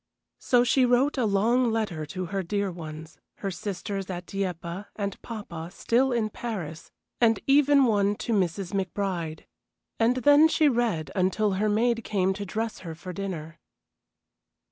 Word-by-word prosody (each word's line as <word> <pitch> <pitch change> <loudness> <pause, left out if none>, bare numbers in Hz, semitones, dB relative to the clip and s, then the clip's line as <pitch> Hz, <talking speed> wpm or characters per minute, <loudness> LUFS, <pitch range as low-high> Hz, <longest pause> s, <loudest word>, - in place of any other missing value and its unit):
So 245 -1 +3
she 255 +2 +3
wrote 250 +4 +3
a 235 - +2
long 230 +5 +3
letter 195 -9 -2
to 185 +5 -4
her 195 +3 -2
dear 200 +2 -1
ones 160 -2 -9 0.2
her 195 - -4
sisters 195 +1 -4
at 180 -1 -5
Dieppe, 180 -1 -4
and 200 -2 -4
papa, 175 -8 -7
still 250 +6 +1
in 225 -3 0
Paris, 175 -11 -6 0.3
and 225 -2 +4
even 280 0 +5
one 205 -3 +2
to 230 - -3
Mrs. 185 -1 -1
McBride. 185 -4 -2 0.6
And 230 +2 +3
then 290 +5 +6
she 315 -1 +3
read 230 - 0
until 195 +3 +1
her 205 +3 +1
maid 230 +2 +1
came 190 -2 +1
to 200 +1 -5
dress 225 +3 -3
her 165 -3 -7
for 180 +3 -8
dinner. 170 -4 -5
200 Hz, 155 wpm, -27 LUFS, 180-230 Hz, 0.6 s, then